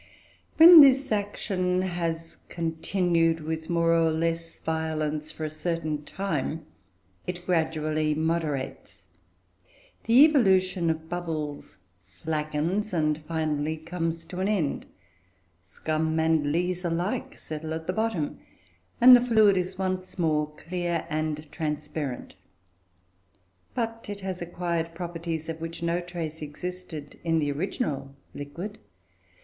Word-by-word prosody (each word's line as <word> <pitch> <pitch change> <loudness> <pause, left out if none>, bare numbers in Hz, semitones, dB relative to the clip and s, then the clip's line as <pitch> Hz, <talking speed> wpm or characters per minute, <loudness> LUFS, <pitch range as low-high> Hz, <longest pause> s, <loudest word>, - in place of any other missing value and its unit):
When 330 0 +11
this 270 -1 +5
action 190 -3 0
has 165 -2 -3
continued, 165 0 +1
with 160 +1 -4
more 170 -1 +3
or 165 -1 +4
less 165 +1 -2
violence, 155 -1 -2
for 155 - -5
a - - -2
certain 155 -1 -2
time, 160 -5 -3 0.6
it 175 0 -5
gradually 155 -3 0
moderates. 150 - -2 1.0
The 245 +6 +8
evolution 190 - +3
of 160 0 -2
bubbles 155 - -4 0.2
slackens, 155 - -2
and 155 -2 +1
finally 155 -1 -1
comes 165 0 -3
to 180 +1 -7
an 190 - +1
end; 190 -9 -1 0.7
scum 155 - -2
and 160 -2 +2
lees 180 +3 0
alike 175 +3 -2
settle 155 0 -6
at 160 0 -6
the 185 - -1
bottom, 220 -9 -1 0.6
and 250 +1 +10
the 245 - +5
fluid 220 -5 +5
is 185 0 -2
once 185 -1 -3
more 155 -3 +1
clear 175 0 -3
and 155 0 -2
transparent. 150 -3 -4 1.4
But 230 -1 -3
it 205 -1 -5
has 190 -2 -4
acquired 170 -1 -3
properties 165 -2 -4
of 165 0 -5
which 165 +1 -6
no 170 +1 +1
trace 170 -3 -5
existed 155 -1 -7
in 165 -1 +2
the 145 -2 +1
original 145 - -3 0.2
liquid. 170 +9 -7
165 Hz, 120 wpm, -27 LUFS, 155-180 Hz, 1.4 s, When